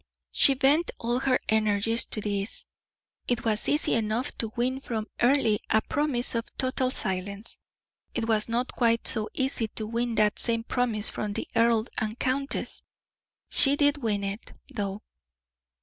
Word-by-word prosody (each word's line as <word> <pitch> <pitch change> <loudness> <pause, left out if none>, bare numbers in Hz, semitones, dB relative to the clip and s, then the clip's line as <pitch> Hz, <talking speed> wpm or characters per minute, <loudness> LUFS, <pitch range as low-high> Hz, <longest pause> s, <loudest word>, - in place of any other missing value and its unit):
She 275 - +4
bent 285 +5 +3
all 240 +2 -1
her 260 -1 +2
energies 220 +1 +2
to 215 - -4
this. 200 0 -3 0.6
It 240 -1 -1
was 215 -1 +2
easy 295 +2 +2
enough 230 +4 -1
to 225 -2 -1
win 255 +2 0
from 225 -5 -4 0.2
Earle 240 -4 +3
a 220 -1 +4
promise 285 -5 -1
of 230 -1 -1
total 255 -1 0
silence; 200 -1 -2 0.6
it 225 - -1
was 220 -1 +2
not 240 +2 -1
quite 230 -2 +1
so 220 -2 -1
easy 265 -4 0
to 215 0 -5
win 235 +1 -2
that 210 -1 +3
same 230 -1 +4
promise 230 -3 -1
from 210 -1 -4
the - - -4
earl 230 -1 +3
and 220 +1 -3
countess. 275 +2 -1 0.7
She 275 0 +7
did 290 0 +2
win 215 -6 -1
it, 200 +3 -5 0.2
though. 200 -3 -4
230 Hz, 155 wpm, -27 LUFS, 215-255 Hz, 0.7 s, She